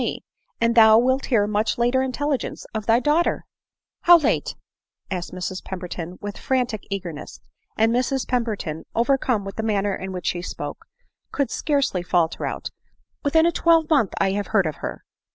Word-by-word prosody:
me, - - -3 0.4
and 230 0 +2
thou 220 -1 +7
wilt 260 +3 +2
hear 220 -6 +3
much 210 +1 0
later 245 +2 +2
intelligence 270 +1 -2
of 220 -1 -4
thy 230 +1 +5
daughter." 300 +6 +1 0.3
" - - -69
How 345 0 +9
late 310 - 0 0.3
?" - - -39
asked 180 -2 -3
Mrs 185 +1 -4
Mowbray, 180 -1 -6
with 205 0 -6
frantic 245 -5 -1
eager 190 -4 -4
ness; 150 - -10 0.2
— - - -43
and 225 +1 +3
Mrs 255 +2 0
Pemberton, 215 -10 -2
overcome 240 -3 +1
with 195 0 -7
the - - 0
manner 205 -2 0
in 190 0 -6
which 180 -3 -6
she 175 - -1
spoke, 180 - -6 0.5
could 280 -3 -1
scarcely 280 - 0
falter 175 -2 0
out, - - -5 0.3
" - - -46
Within 320 +2 +4
a 340 - +4
twelvemonth 320 - +3
I 190 - +2
have 200 +1 -2
heard 195 -4 +2
of 155 -2 -3
her." - - -6
220 Hz, 185 wpm, -23 LUFS, 190-265 Hz, 0.5 s, How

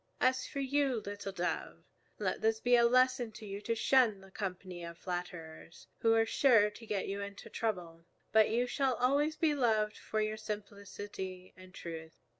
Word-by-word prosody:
As 255 0 +2
for 280 - -4
you, 275 -2 +1
little 200 0 -5
Dove, 180 -1 -3 0.3
let - - -1
this 220 0 +2
be 245 +2 +4
a 235 -1 +6
lesson 255 -1 +3
to 220 - -10
you 200 0 -6
to 230 +2 -1
shun 230 -3 +4
the 195 0 -15
company 185 -3 -5
of 170 0 -7
flatterers, 175 -3 -6
who 225 0 +4
are 225 0 +4
sure 225 -4 +4
to 225 +2 -12
get 205 -2 -1
you 200 +1 -3
into 200 0 -8
trouble. 175 -7 -3 0.3
But 220 -1 +5
you 240 +2 +2
shall 265 0 +1
always 285 +6 +2
be 310 -1 +2
loved 220 -6 +2
for 215 - -2
your 215 0 0
simplicity 200 -3 -7
and 185 0 -14
truth. 160 -3 -8
215 Hz, 180 wpm, -33 LUFS, 190-245 Hz, 0.3 s, a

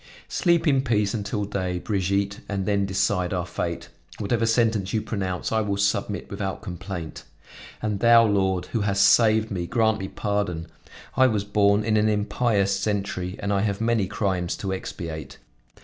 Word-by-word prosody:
Sleep 170 -2 +2
in 135 -3 +4
peace 105 -5 +1
until 105 -1 -2
day, 95 -3 -2
Brigitte, 100 +1 -1
and 100 -2 -2
then 100 -1 +1
decide 95 -1 0
our 90 -1 -2
fate; 85 0 -4 0.3
whatever 115 +2 0
sentence 110 -4 +1
you 110 - +1
pronounce, 95 -4 -3
I 110 0 +2
will 100 -2 -1
submit 100 0 0
without 95 +2 -4
complaint. 90 -4 -6 0.6
And 105 -2 -1
thou, 115 0 +6
Lord, 95 -3 +1
who 115 - +1
hast 100 -1 +3
saved 110 -1 +4
me, 90 -3 -3
grant 110 0 +2
me 95 - -4
pardon. 100 -6 -2 0.5
I 130 - +5
was 105 -5 0
born 100 0 +3
in 110 -1 +2
an 105 +1 +3
impious 105 -1 +1
century, 100 -3 -2
and 100 0 -2
I 100 - +2
have 100 -1 -1
many 115 -3 +1
crimes 95 -4 -1
to 95 -1 -3
expiate. 80 -7 -6
100 Hz, 165 wpm, -24 LUFS, 95-110 Hz, 0.6 s, thou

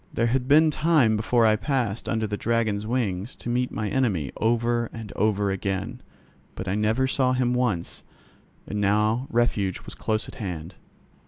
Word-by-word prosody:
There 115 - 0
had 125 +2 0
been 155 +2 +5
time 150 -8 +3
before 115 +2 +2
I 110 -1 +5
passed 120 -4 -2
under 110 -1 0
the 105 -1 -2
Dragon's 110 -2 0
wings 110 -4 -2
to - - -7
meet 125 +1 0
my 105 0 -3
enemy 100 - 0
over 120 +1 +1
and 110 -3 -8
over 105 -1 +1
again, 95 0 -3 0.5
but 95 - -6
I 95 - 0
never 110 +5 +1
saw 130 -1 +1
him 125 -1 +1
once, 120 -9 -1 0.6
and 105 0 -3
now 105 +5 +2
refuge 110 -5 0
was - - -8
close 110 0 -2
at - - -10
hand. 90 -3 -5
110 Hz, 170 wpm, -25 LUFS, 105-125 Hz, 0.6 s, been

